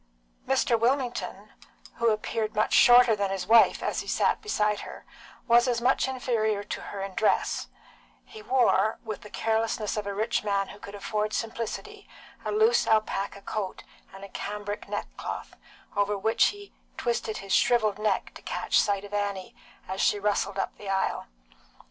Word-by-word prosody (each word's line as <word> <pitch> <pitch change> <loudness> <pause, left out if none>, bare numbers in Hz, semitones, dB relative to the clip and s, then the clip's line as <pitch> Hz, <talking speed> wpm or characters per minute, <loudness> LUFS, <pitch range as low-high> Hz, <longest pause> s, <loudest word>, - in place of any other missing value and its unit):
Mr. 230 - +2
Wilmington, 245 0 -1 0.4
who 235 -1 +3
appeared 215 0 -2
much 215 - +1
shorter 245 -2 +7
than 200 -1 -1
his 190 -1 -3
wife 225 +3 +5
as - - -1
he - - -6
sat - - +1
beside 210 - 0
her, - - -9 0.4
was 240 +1 +5
as 240 -2 +1
much 255 +3 +2
inferior 225 -5 -1
to 210 - -5
her 200 - -7
in 195 -1 -6
dress; 215 - +1 0.6
he 435 - -12
wore, 235 - +2
with 215 -2 -6
the 210 - -11
carelessness 220 -1 -1
of 210 -1 -3
a 200 - -2
rich 215 +1 0
man 200 -2 0
who 205 - -11
could 200 0 -9
afford 210 +1 -2
simplicity, 235 - -5 0.3
a - - -2
loose 440 +3 +3
alpaca 200 -2 0
coat 205 -3 -4 0.3
and 195 +1 -12
a 200 - -9
cambric 205 +1 -5
neckcloth, 205 - -5 0.4
over 205 0 +1
which 220 +3 +3
he 410 -1 -7 0.2
twisted 235 -2 -2
his 195 0 -4
shrivelled 215 -4 +3
neck 215 0 0
to - - -12
catch - - +1
sight 200 -1 +1
of 205 - -12
Annie, 200 -2 -3 0.3
as 190 +1 -3
she - - +3
rustled 200 -1 -1
up 195 - -2
the 200 - -7
aisle. 190 0 -1
215 Hz, 165 wpm, -27 LUFS, 200-235 Hz, 0.6 s, shorter